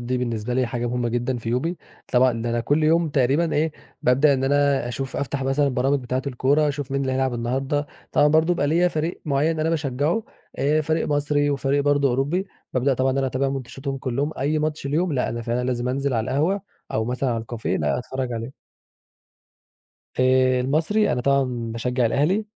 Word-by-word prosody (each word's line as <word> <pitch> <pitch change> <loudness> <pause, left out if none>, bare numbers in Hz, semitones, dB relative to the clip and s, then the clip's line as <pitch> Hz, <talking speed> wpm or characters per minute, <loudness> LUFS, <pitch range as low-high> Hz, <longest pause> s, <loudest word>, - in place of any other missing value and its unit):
دي 125 +1 -2
بالنسبة 120 -1 -2
لي 130 -1 +2
حاجة 120 0 -3
مهمة 120 0 -1
جدًا 120 +2 -1
في 115 0 -6
يومي، 160 +9 -1 0.4
طبعًا 125 -2 +3
ده 120 - -1
أنا 120 0 0
كل 145 +6 +1
يوم 165 +1 +3
تقريبًا 145 +4 +2
إيه، 155 +1 +1 0.3
بابدأ 135 +3 +4
إن 130 - -1
أنا 140 -2 +2
أشوف 135 +2 -4
أفتح 140 -1 -2
مثلًا 135 +2 +1
البرامج 135 +1 +1
بتاعة 130 +1 -2
الكورة 140 +3 +2
أشوف 140 -1 -4
مين 140 - 0
اللي 130 -1 -1
هيلعب 130 -1 0
النهارده، 135 +5 -1 0.3
طبعًا 145 - +5
برضه 160 +1 +4
بيبقي 145 - 0
ليّا 175 +3 +3
فريق 160 +1 -3
معيّن 155 +2 +1
أنا 160 +1 +1
باشجعه 150 - 0 0.4
آآ 145 +4 +2
فريق 160 +1 0
مصري، 145 0 +1
وفريق 140 0 +1
برضه 145 -1 +3
أوروبي، 145 +10 0 0.3
بابدأ 130 +1 +2
طبعًا 130 +1 +1
إن 135 - -1
أنا 135 - +1
أتابع 135 +1 0
ماتشاتهم 135 +1 -4
كلهم، 140 +4 -2
أي 145 +3 +1
ماتش 155 -1 -2
ليهم 160 +4 0
لأ، 125 - 0
أنا 115 0 -4
فعلًا 120 +2 -1
لازم 125 -1 -1
أنزل 135 +1 -1
على 110 -1 0
القهوة 160 +9 +1 0.3
أو 110 - 0
مثلًا 125 +2 -1
على 115 -1 -1
الكافيه 115 0 -3
لأ، - - 0
أتفرّج 130 0 -4
عليه. 115 +3 -5 1.7
آآ، 130 0 +4
المصري، 160 +11 +1
أنا 125 - -1
طبعًا 140 +2 +3 0.3
باشجع 125 +1 0
الأهلي، 175 - +1
135 Hz, 195 wpm, -23 LUFS, 125-145 Hz, 1.7 s, طبعًا